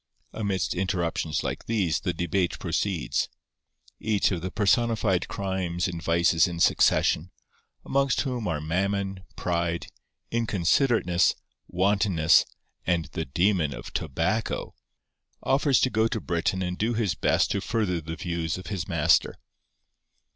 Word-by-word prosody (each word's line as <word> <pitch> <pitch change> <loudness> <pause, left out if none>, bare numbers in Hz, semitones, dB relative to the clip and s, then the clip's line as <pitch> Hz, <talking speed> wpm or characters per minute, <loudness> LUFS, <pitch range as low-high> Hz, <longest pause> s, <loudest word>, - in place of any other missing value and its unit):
Amidst 100 -5 -1
interruptions 85 -4 -1
like - - -4
these 100 -9 +1
the 90 - -1
debate 85 +2 -1
proceeds. 85 -7 -1 0.7
Each 105 -3 +1
of 90 -3 -2
the 95 - -3
personified 105 -2 +1
crimes 95 -3 -2
and 85 -2 -5
vices 85 -1 +3
in 85 -1 -5
succession—amongst 135 - +1
whom 125 -5 -3
are 80 -4 -1
Mammon, 95 +4 -1
Pride, 85 -1 -2 0.4
Inconsiderateness, 110 - +2 0.3
Wantonness, 95 -3 +3 0.4
and 85 -2 +1
the 80 - -3
Demon 85 0 +1
of - - -9
Tobacco—offers 115 - -2
to 130 - +3
go 110 +1 +2
to 115 -1 -2
Britain 90 +1 -1
and 90 0 -4
do 115 +2 0
his 110 -4 +1
best - - +1
to 100 - 0
further 100 -6 -1
the 80 +1 -6
views 85 -2 -3
of 95 - -9
his 95 -5 -3
master. 80 0 +2
90 Hz, 125 wpm, -26 LUFS, 85-105 Hz, 0.7 s, vices